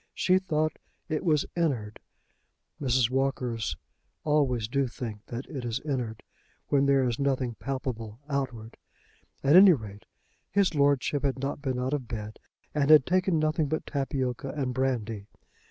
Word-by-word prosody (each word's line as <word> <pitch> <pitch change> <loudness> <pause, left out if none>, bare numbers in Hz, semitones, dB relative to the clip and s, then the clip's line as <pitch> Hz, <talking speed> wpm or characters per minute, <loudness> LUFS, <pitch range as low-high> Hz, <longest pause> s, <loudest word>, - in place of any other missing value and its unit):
She 185 0 +3
thought 155 -4 -1 0.3
it 155 -1 -1
was 155 -4 +2
"in'ard." 130 -11 -1 0.8
Mrs. 125 -3 +2
Walkers 125 - -1 0.5
always 135 -7 +1
do 135 +3 0
think 110 -3 -6
that 120 +3 -5
it 135 -5 -6
is 120 -1 -1
"in'ard" 125 -7 -3 0.5
when 140 -1 +3
there 135 -2 +4
is 120 -2 -2
nothing 130 -3 0
palpable 115 -2 -4
outward. 130 -6 -3 0.7
At 140 +3 +5
any 190 0 +10
rate 105 -7 -7 0.4
his 200 -3 +2
lordship 145 -1 +2
had 135 -2 0
not 140 +2 -3
been 130 -3 -2
out 130 +2 -1
of 135 -5 -2
bed 110 -1 -6 0.3
and 145 -1 +1
had 155 -3 +8
taken 185 -1 +2
nothing 155 0 +1
but 155 +2 -2
tapioca 135 -2 -2
and 135 -3 -2
brandy. 115 -6 -2
135 Hz, 150 wpm, -28 LUFS, 120-150 Hz, 0.8 s, any